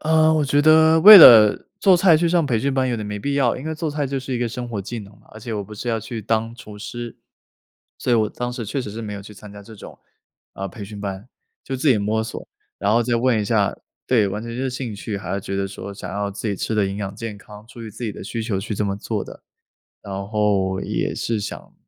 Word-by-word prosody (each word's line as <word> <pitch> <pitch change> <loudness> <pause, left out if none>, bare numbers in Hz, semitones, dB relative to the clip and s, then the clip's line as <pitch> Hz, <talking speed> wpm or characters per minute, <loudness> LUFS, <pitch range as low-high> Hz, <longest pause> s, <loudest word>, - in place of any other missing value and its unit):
呃， 160 0 +3
我 155 -2 +1
觉 145 +1 +2
得 160 +1 +5
为 210 +5 +12
了 110 - +8
做 190 -2 +5
菜 175 -2 +5
去 170 +2 +1
上 170 -1 +2
培 120 -4 +1
训 140 +5 -1
班， 130 -1 +1
有 120 - -1
点 110 - -5
没 105 0 -5
必 140 +7 -2
要， 135 -4 +1
因 130 - -8
为 160 - -3
做 160 -1 -3
菜 145 -1 -2
就 135 0 -3
是 130 0 -6
一 - - -1
个 120 -1 -1
生 120 +1 -6
活 110 -4 -4
技 115 +4 -6
能 100 -1 -11
嘛， 105 - -26
而 110 - -11
且 115 +1 -6
我 105 -1 -4
不 105 +2 -11
是 120 - -6
要 115 -1 0
去 115 +2 -6
当 115 +2 -1
厨 105 -3 -12
师。 120 +2 -7 0.8
所 125 - -1
以 - - +5
我 110 -1 +1
当 125 +3 -5
时 120 -3 -6
确 135 +7 -3
实 115 - -6
是 110 +3 -7
没 105 -2 -6
有 100 - -8
去 100 - -12
参 105 +1 -13
加 100 0 -11
这 110 +2 -13
种， 100 - -12 0.5
啊， 95 0 -5
培 105 +2 -9
训 100 +1 -9
班， 100 +2 -6 0.4
就 135 - -5
自 130 +4 0
己 130 - +5
摸 105 +2 -1
索， 110 - -7 0.3
然 100 +2 +1
后 120 +2 +3
再 120 0 0
问 120 -2 +2
一 - - -2
下 105 -1 +1 0.3
对， 110 -6 +3
完 105 +3 -5
全 115 0 -7
就 125 - -4
是 - - -1
兴 125 -3 -5
趣， 100 +1 -5
还 95 -3 -7
要 100 - -2
觉 100 0 -5
得 100 0 -1
说， 100 +1 -8
想 95 -2 -8
要 100 0 -2
自 100 +3 -6
己 105 - -1
吃 110 +3 -3
得 105 - +2
营 95 - -4
养 100 -1 -5
健 110 -2 -6
康， 105 +1 -14
出 115 0 -12
于 110 - -8
自 120 - -8
己 105 - -3
的 - - -10
需 115 - -5
求 105 -4 -2
去 105 +1 -5
这 105 - -1
么 100 -1 -1
做 105 0 -4
的。 - - -13 0.6
然 100 - -8 0.2
后 100 -3 0
也 - - -2
是 115 -2 -2
想 - - -8
110 Hz, 300 characters per minute, -21 LUFS, 100-125 Hz, 0.8 s, 为